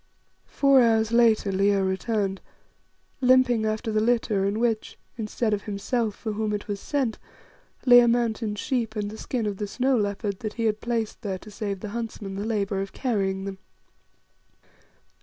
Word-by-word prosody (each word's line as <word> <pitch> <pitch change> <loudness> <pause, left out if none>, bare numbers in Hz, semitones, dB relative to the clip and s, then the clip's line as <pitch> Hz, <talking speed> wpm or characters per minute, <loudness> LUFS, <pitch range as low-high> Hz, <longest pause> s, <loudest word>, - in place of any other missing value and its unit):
Four 275 -2 +4
hours 225 -2 +3
later 230 -4 +4
Leo 195 +1 +2
returned, 195 0 -1 0.8
limping 250 -3 +4
after 215 +1 -2
the 215 - +2
litter 225 -4 +1
in 200 +2 0
which, 230 -2 -1 0.2
instead 220 0 -1
of 205 -1 -2
himself, 215 +1 -1
for 220 - -4
whom 215 0 -1
it 205 - -4
was 205 -1 -3
sent, 265 -4 -1 0.7
lay 245 -1 +9
a 240 - +5
mountain 230 -2 0
sheep 230 0 -2
and 205 -1 -2
the 220 - -8
skin 240 -4 -2
of 205 -2 -2
the 205 - -3
snow 260 +5 +1
leopard 205 -2 -1
that 215 -1 -4
he 230 - -3
had 215 -1 0
placed 230 -2 -2
there 195 -3 -3
to 210 +3 -13
save 200 -3 -4
the 210 - -5
huntsmen 215 -3 -5
the 200 +2 -3
labour 200 -3 -1
of 195 - -6
carrying 195 -7 -1
them. 195 -1 -6
215 Hz, 175 wpm, -25 LUFS, 200-235 Hz, 0.8 s, lay